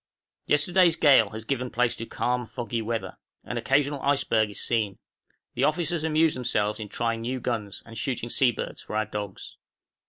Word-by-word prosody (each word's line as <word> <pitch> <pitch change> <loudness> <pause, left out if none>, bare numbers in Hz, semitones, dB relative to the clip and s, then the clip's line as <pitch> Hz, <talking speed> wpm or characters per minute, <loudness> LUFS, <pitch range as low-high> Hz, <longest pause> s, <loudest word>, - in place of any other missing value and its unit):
Yesterday's 170 +3 +4
gale 135 -10 +6
has 110 +1 -7
given 125 0 -1
place 125 0 +1
to 115 - -6
calm 125 -1 -1
foggy 120 -1 -3
weather. 115 +1 -4 0.2
An - - -4
occasional 140 +1 +1
iceberg 135 -6 +2
is 105 - -5
seen. 110 -5 0 0.6
The 130 - +2
officers 170 +1 0
amuse 160 0 +3
themselves 110 -4 0
in 105 -2 -6
trying 115 0 -1
new 125 +3 -2
guns, 110 -5 -3
and 115 - -11
shooting 120 0 -2
sea 135 -3 +4
birds - - -6
for - - -7
our 110 0 +1
dogs. 105 -2 -7
120 Hz, 175 wpm, -26 LUFS, 110-140 Hz, 0.6 s, gale